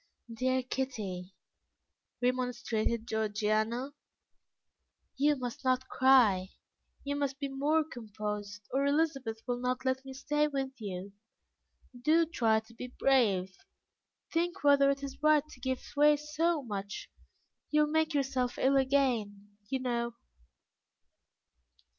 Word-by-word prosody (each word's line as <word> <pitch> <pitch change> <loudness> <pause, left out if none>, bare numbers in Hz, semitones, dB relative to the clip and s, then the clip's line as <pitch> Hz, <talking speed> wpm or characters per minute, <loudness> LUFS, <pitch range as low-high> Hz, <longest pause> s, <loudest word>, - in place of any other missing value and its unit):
"Dear 255 +2 0
Kitty," 205 -9 -4 0.9
remonstrated 240 -3 0
Georgiana, 220 +4 0 1.2
"you 295 +2 +3
must 250 -1 -6
not 255 0 +1
cry; 235 -8 +4 0.5
you 285 0 -2
must 280 -2 -1
be 280 -1 -3
more 290 +4 +1
composed, 210 -6 -6
or 270 +2 +1
Elizabeth 280 -6 0
will 245 -2 -2
not 250 +1 -2
let 260 0 0
me 265 -1 -8
stay 295 +3 +1
with 270 -2 -2
you. 195 -1 -6 0.9
Do 320 +5 +4
try 225 -9 +2
to 220 +1 -19
be 250 +2 -7
brave; 215 -8 +2 0.8
think 340 -2 -1
whether 280 -1 +6
it 280 0 -1
is 275 0 -7
right 305 -1 +4
to 260 - -14
give 260 +1 -2
way 295 +1 +6
so 300 +1 0
much; 200 -3 -6 0.6
you 300 0 +3
will 300 0 +1
make 315 0 +1
yourself 265 -3 0
ill 270 +1 +3
again, 240 -7 +1 0.2
you 265 - -1
know." 235 -2 -2
260 Hz, 125 wpm, -31 LUFS, 220-280 Hz, 1.2 s, whether